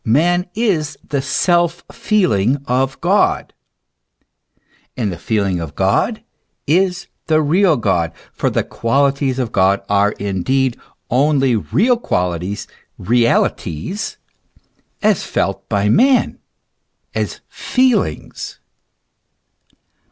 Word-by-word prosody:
man 175 +10 +2
is 165 -10 0
the 140 -2 0
self 175 +4 +1
feeling 140 - +1
of 130 +1 0
God; - - +1 1.4
and 110 -6 -1
the - - -7
feeling 100 -3 0
of 80 -4 -6
God - - +1 0.4
is 180 +4 +1 0.2
the 155 -1 +3
real 165 +3 +3
God; 90 -7 0 0.2
for - - 0
the - - 0
qualities 135 +2 0
of 125 -4 -2
God 95 -1 +3
are 100 +1 +2
indeed 115 +7 -1 0.4
only 135 -1 +3
real 230 - +2
qualities, 90 - -2 0.3
realities, 115 - 0 0.9
as 210 -2 +3
felt 95 0 -2
by 100 -1 +1
man, 255 - +3 0.7
as - - -3
feelings. 255 -1 -1
135 Hz, 100 wpm, -18 LUFS, -, 1.4 s, the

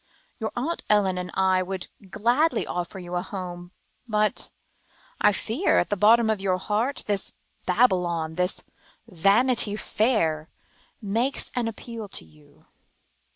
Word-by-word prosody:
"Your 220 -1 -2
Aunt 300 +8 -2
Ellen 195 -3 +3
and 180 0 -5
I 190 -1 +3
would 185 0 -4 0.2
gladly 240 - +2
offer 175 +1 -4
you 180 -1 -8
a 175 - 0
home, 175 -2 -7 0.4
but 215 -1 +1 0.7
I 210 - +5
fear 225 - 0
that, - - +6
at - - -4
the - - +3
bottom 220 +3 +5
of 215 -3 0
your 185 -2 +1
heart, 215 +8 -1
this 200 -2 -2 0.3
Babylon, 180 -6 +2
this 180 +3 -1 0.4
Vanity 210 +4 +3
Fair, 210 -9 0 0.5
makes 230 +7 0
an 245 -2 -1
appeal 225 0 -6
to 190 - -6
you." 75 -2 -22
205 Hz, 140 wpm, -25 LUFS, 180-225 Hz, 0.7 s, that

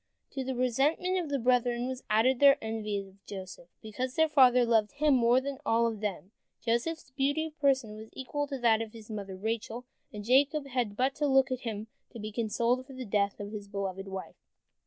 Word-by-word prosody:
To 270 - -3
the 260 0 -3
resentment 285 +10 +1
of 335 -4 -4
the 285 - 0
brethren 245 -1 +1
was 260 -1 -5
added 240 +4 +3
their 280 0 +7
envy 220 -2 -3
of 195 0 -9
Joseph, 185 -3 -8 0.2
because 250 +4 -4
their 320 0 +4
father 255 -5 +5
loved 225 -1 +2
him 295 0 +3
more 245 0 +4
than 275 0 -5
all 230 -3 +2
of 225 -2 -2
them. 200 -2 -4 0.3
Joseph's 255 +6 -2
beauty 285 +3 0
of 315 -1 -10
person 265 -7 +2
was 220 +1 -10
equal 290 +2 -3
to 275 -1 -4
that 230 -3 +3
of 225 -1 -6
his 225 -1 -11
mother 200 -3 -6
Rachel, 225 +3 -3 0.3
and 210 -3 -7
Jacob 280 +4 +3
had 245 -6 -2
but 260 +2 +2
to 295 - +1
look 265 -1 +4
at 255 - -1
him 220 -4 -5 0.3
to 235 - -8
be 215 0 -5
consoled 235 +3 0
for 270 - -11
the 255 -1 -6
death 200 -1 0
of 205 0 -6
his 205 -2 -7
beloved 195 -1 -4
wife. 190 -1 -7
240 Hz, 210 wpm, -30 LUFS, 215-270 Hz, 0.3 s, their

